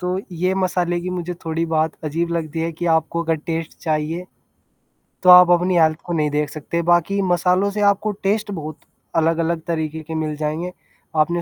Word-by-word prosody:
तो 180 +1 -1
ये 180 +3 0
मसाले 180 -2 0
की 180 +1 -4
मुझे 180 -1 -4
थोड़ी 165 +1 -1
बात 160 -1 +1
अजीब 165 +3 -1
लगती 165 -1 -3
है 165 +1 -1
कि 175 +2 -4
आपको 170 +1 -2
अगर 165 0 +1
टेस्ट 165 -1 -4
चाहिए 160 +2 -1 1.0
तो 180 - +5
आप 180 0 +10
अपनी 175 +1 +3
हेल्थ 155 -1 +4
को 175 - -3
नहीं 150 -2 +1
देख 150 0 -1
सकते, 160 +3 -3
बाकी 175 +4 +2
मसालों 180 +3 +2
से 210 +1 -3
आपको 210 +2 -2
टेस्ट 205 +1 0
बहुत 155 -4 -6 0.4
अलग-अलग 165 0 +1
तरीक़े 160 -1 -2
के 160 - -5
मिल 155 -1 -2
जाएँगे, 155 +4 -3 0.4
आपने 170 +3 +2
170 Hz, 185 wpm, -21 LUFS, 160-180 Hz, 1.0 s, आप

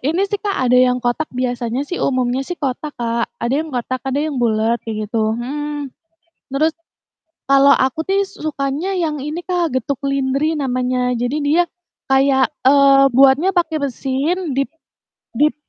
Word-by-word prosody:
Ini 330 +6 +1
sih, 410 - -1
Kak, 405 -2 -2
ada 250 - +4
yang 250 0 +4
kotak, 245 +6 -1
biasanya 245 0 -2
sih 355 +5 -5
umumnya 255 -1 0
sih 355 - -4
kotak, 290 +1 -4
Kak. 235 -1 -1
Ada 235 +3 0
yang 320 - -5
kotak, 255 +1 -2
ada 265 +1 0
yang 305 -2 -2
bulat 225 0 +1
kayak 215 -2 -4
gitu 220 0 0
mhm. 290 +2 -4 0.6
Terus, 310 +4 +2 0.8
kalau 275 0 +6
aku 260 +3 0
sih 395 +1 +2
su 395 0 -12
sukanya 300 +5 -2
yang 320 -5 -1
ini 300 +5 -5
Kak, 345 -6 -1
getuk 260 +1 -2
lindri 275 +3 0
namanya. 250 -2 -1
Jadi 245 +5 -1
dia 310 +5 +3 0.4
kayak, 270 0 +3 0.2
eee, 275 0 +6
buatnya 270 +8 +5
pakai 340 -4 0
mesin 280 +5 -2
dip 275 0 -1 0.7
dip 300 +1 +3
275 Hz, 160 wpm, -19 LUFS, 250-310 Hz, 0.8 s, kalau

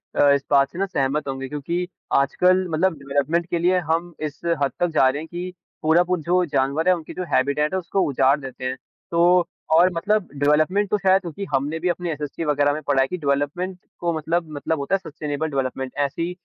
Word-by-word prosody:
अ, 145 - +5
इस 140 0 +2
बात 140 -1 +4
से 175 - -8
ना 195 - +2
सहमत 140 -5 -1
होंगे, 135 0 -4
क्योंकि 170 +5 -3 0.3
आजकल 180 +7 +3
मतलब 165 +3 +1
डेवलपमेंट 145 +5 0
के 170 - 0
लिए 180 +2 +3
हम 170 +1 -1
इस 145 - -12 0.2
हद 140 - +1
तक 175 - +3
जा 155 -5 +3
रहे 145 +3 -3
हैं, 160 - -8
कि 175 +2 -6 0.3
पूरा 160 +3 +4
पू 180 0 0
जो 180 +3 +1
जानवर 140 +2 0
है, 185 - +5
उनकी 160 -3 -9
जो 185 - -4
हैबिटैट 140 +4 +1
उसको 190 +1 -1
उजाड़ 135 +1 +3
देते 130 -2 -8
हैं। 130 0 -1 0.4
तो 175 +1 +4 0.3
और 175 +3 +6
मतलब 200 +3 0
डेवलपमेंट 155 +8 +2
तो 210 - +2
ख़ैर 190 -1 +4
क्योंकि 180 +1 -6
हमने 145 +4 0
भी 180 +2 0
अपने 175 -1 -2
एसएसटी 150 +1 -5
वग़ैरह 145 -1 +2
में 155 - -4
पढ़ा 140 -2 +3
है 135 - +2
कि 180 - -4
डेवलपमेंट 150 +5 -1 0.2
तो 170 -1 0
मतलब, 165 +2 -1
मतलब 150 +1 -2
होता 140 +7 0
है - - +2
सस्टेनेबल 150 +1 -3
डेवलपमेंट 135 -2 -2
ऐसी, 155 +5 -1
160 Hz, 210 wpm, -23 LUFS, 140-175 Hz, 0.4 s, और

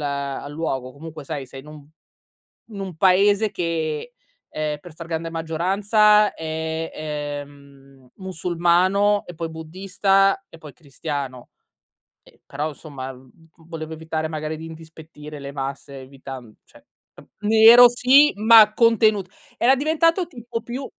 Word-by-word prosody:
al 140 -1 -4
luogo. 135 -5 -4
Comunque, 155 +1 -10
sai, 140 -2 -6
sei 135 +1 -11
in 140 - -18
un 150 -2 -13 0.9
in 200 - -8
un 190 -3 -6
paese 200 +5 +3
che, 165 +2 -3 0.4
ehm, 150 -1 -3
per 175 +4 -14
stragrande 165 0 -6
maggioranza 200 +6 +2
è, 160 0 -4
ehm, 145 -3 -8
musulmano 185 +3 +1
e 175 - -10
poi 165 0 -5
buddista 195 +4 0
e 165 - -16
poi 150 -3 -12
cristiano. 140 -3 -7 0.7
Ehm, - - -22
però, 150 +3 -3
insomma 140 -3 -9
v 130 0 -18 0.4
volevo 160 -1 -7
evitare 160 0 -4
magari 155 0 -5
di 160 - -9
indispettire 160 -2 -12
le 140 0 -8
masse, 140 0 -6
evitan 130 -3 -11
cioè - - -21 0.6
nero 225 +3 +8
sì, 255 +5 +4
ma 215 0 +6
contenut 215 -4 +3 0.3
era 250 +3 +4
diventato 325 +5 +1
tipo 240 -6 -7
più 250 +4 -6
160 Hz, 130 wpm, -22 LUFS, 145-200 Hz, 0.9 s, nero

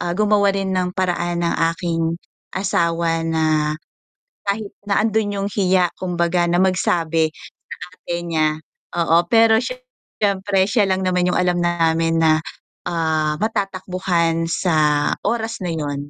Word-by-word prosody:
ah 175 0 -2
gumawa 210 -1 +3
rin 195 -1 -2
ng 180 -1 -1
paraan 175 -1 -1
ang 170 - 0 0.2
aking 165 -1 -2 0.4
asawa 170 -3 0
na, 155 -2 +1 0.7
kahit 200 0 -2 0.2
nandoon 205 -1 0
yung - - -1
hiya 185 -3 +2
kumbaga 175 -1 0
na 170 - +1
magsabi 165 -4 +1
sa - - -13 0.5
ate 175 - -5
niya 160 -2 +2 0.5
oo 165 -1 +3
pero 225 -1 +6
syempre 205 - -2
siya 210 0 +2
lang 190 0 +1
naman 180 -1 +1
yung - - 0
alam 180 -1 +1
namin 165 -1 +1
na 155 -1 +4 0.5
ah 160 -3 0
matatakbuhan 185 -5 -1
sa 155 -4 +2
oras 230 -1 -2
na 180 - -2
yun, 145 -2 -4
175 Hz, 130 wpm, -20 LUFS, 165-195 Hz, 0.7 s, pero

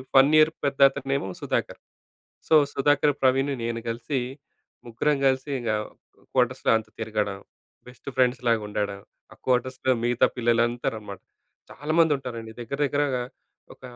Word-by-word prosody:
Fun 135 +3 +7
year 155 +1 +6
పెద్దతను 135 0 +3
ఏమో 95 - -4
Sudhakar. - - -2 0.7
So, 160 - +4 0.2
Sudhakar, 145 +1 +3
Praveen, 135 +2 +3
నేను 115 0 -2
కలిసి 120 +4 -2 0.7
ముగ్గురం 140 +6 0
కలిసి 130 +2 +1
ఇంగ 120 - -2 0.6
కోటర్స్‌లో 130 0 +1
అంతా 110 -1 -5
తిరగడం, 105 -3 -2 0.5
బెస్ట్ 125 +2 -12
ఫ్రెండ్స్‌లాగా 125 -3 +2
ఉండడం. 100 -1 -3 0.3
ఆ - - -24
కోటర్స్‌లో 130 +1 +1
మిగతా 120 0 +3
పిల్లలందరనమాట. 115 -4 0 0.5
చాలా 150 +3 -4
మంది 160 -2 +4
ఉంటారండి. 115 -4 -7
దగ్గర 130 +4 -5
దగ్గరగా 140 -3 0 0.5
ఒక - - -34
125 Hz, 125 wpm, -25 LUFS, 115-135 Hz, 0.7 s, Fun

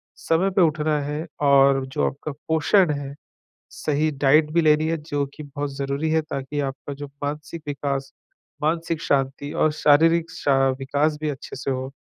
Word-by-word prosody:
समय 170 +4 +1
पे 185 0 +2
उठना 155 -2 +2
हैं 150 +3 -3 0.2
और 135 -1 +5
जो 130 - -1
आपका 145 +2 -5 0.2
पोषण 160 +3 +3
है, 140 -1 -4 0.6
सही 155 +1 0
डाइट 150 +3 +5
भी 170 - +4
लेनी 155 0 +4
है, 165 - 0
जो 145 -2 -3
कि 155 - -8
बहुत 145 0 -5
ज़रूरी 140 +3 -2
है, 160 0 +3
ताकि 140 0 -4
आपका 135 +1 -5
जो 145 +1 -7 0.2
मानसिक 150 +2 -5
विकास, 140 -1 -3 0.5
मानसिक 165 +1 0
शांति 140 +1 -1
और 155 - +2
शारीरिक 165 +3 +4
शा 140 -4 +1 0.2
विकास 145 +3 0
भी 155 - -1
अच्छे 135 - -8
से 135 +1 -3
हो। 130 0 -2
145 Hz, 170 wpm, -23 LUFS, 140-155 Hz, 0.6 s, और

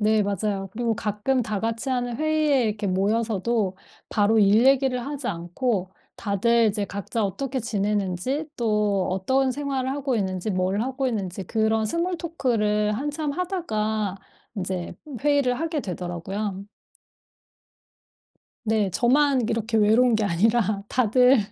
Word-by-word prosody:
네. 215 0 +3
맞아요. 200 -1 -2
그리고 230 +1 0
가끔 215 +5 0
다 215 -2 -2
같이하는 240 +2 -2
회의에 310 -2 +2
이렇게 210 -1 -1
모여서도 205 +1 0 0.3
바로 215 +1 +3
일 210 +3 +5
얘기를 265 -2 +3
하지 285 -2 -5
않고 185 +3 -2 0.2
다들 230 +3 +2
이제 205 0 -1
각자 200 +3 -3
어떻게 260 +7 -2
지내는지 210 - -1
또 210 -4 +1
어떤 260 +9 +1
생활을 270 -1 -2
하고 275 -2 -1
있는지 190 -2 -1
뭘 185 +1 0
하고 265 +1 -2
있는지 195 -5 -3
그런 220 +2 +1
스몰토크를 255 -10 0
한참 290 +5 -2
하다가 220 - -2 0.4
인제 185 -2 -3 0.3
회의를 285 -3 +2
하게 320 -1 -1
되더라고요. 190 +1 -4 2.0
네. 215 -2 +1
저만 270 - +3
이렇게 225 0 0
외로운 220 +3 +4
게 215 - +1
아니라 205 +2 +1
다들 250 +2 +4
220 Hz, 285 characters per minute, -24 LUFS, 200-260 Hz, 2.0 s, 일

